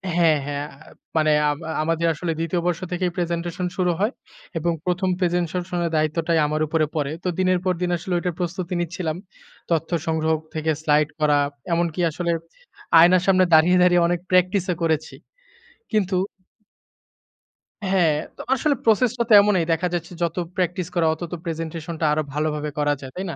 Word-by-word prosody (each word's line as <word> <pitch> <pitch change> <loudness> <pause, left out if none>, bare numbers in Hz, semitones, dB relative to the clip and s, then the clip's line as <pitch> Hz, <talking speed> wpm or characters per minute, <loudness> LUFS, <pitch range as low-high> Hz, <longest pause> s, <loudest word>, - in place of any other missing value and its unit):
হ্যাঁ, 165 -3 +4
হ্যাঁ। 145 0 -3 0.2
আ - - -19 0.3
মানে 155 -1 +3 0.2
আম 145 - -1 0.3
আমাদের 165 +1 0
আসলে 165 +2 -3
২য় 165 +1 -1
বর্ষ 175 -2 0
থেকেই 180 0 -1
প্রেজেন্টেশন 175 0 -2
শুরু 180 -2 +2
হয় 210 +4 +1 0.5
এবং 170 +2 0
১ম 185 +1 0
প্রেজেন্টেশনের 175 -1 -1
দায়িত্বটাই 160 +2 +1
আমার 155 +1 -1
উপরে 155 0 +1
পড়ে। 145 -2 -1
তো - - -2
দিনের 185 -1 +2
পর 185 - +2
দিন 180 - 0
আসলে 180 +2 -5
ওইটার 175 -1 -3
প্রস্তুতি 180 0 -3
নিচ্ছিলাম। 170 -1 -3 0.5
তথ্য 165 -1 +1 0.2
সংগ্রহ 160 0 +1 0.2
থেকে 160 0 0
স্লাইড 150 -1 +2
করা। 150 -1 +3 0.4
এমনকি 170 0 0
আসলে, 170 +2 -2 0.7
আয়নার 175 +2 +6
সামনে 185 -1 +5
দাঁড়িয়ে, 165 +3 +6
দাঁড়িয়ে 175 -1 +4
অনেক 175 0 0
প্র্যাকটিস 185 +1 +3
এ - - -7
করেছি। 160 -2 -1 0.8
কিন্তু 195 -3 +1 1.7
হ্যাঁ, 185 -5 +3 0.2
তো - - -7
আসলে 285 +3 +1
প্রসেস 225 +1 +3
টা - - +3
তো - - +6
এমনই। 200 -4 +2
দেখা 165 +2 +1
যাচ্ছে 170 0 -3
যত 165 -1 -1 0.2
প্র্যাকটিস 180 0 -1
করা 165 -2 +3
অত 160 - -11
তো - - -2
প্রেজেন্টেশনটা 165 0 -4
আরো 155 - +1
ভালোভাবে 150 0 -1
করা 145 0 +2
যায়। 130 -1 -8
তাই 185 - -4
না? - - -7
170 Hz, 165 wpm, -23 LUFS, 160-180 Hz, 1.7 s, আয়নার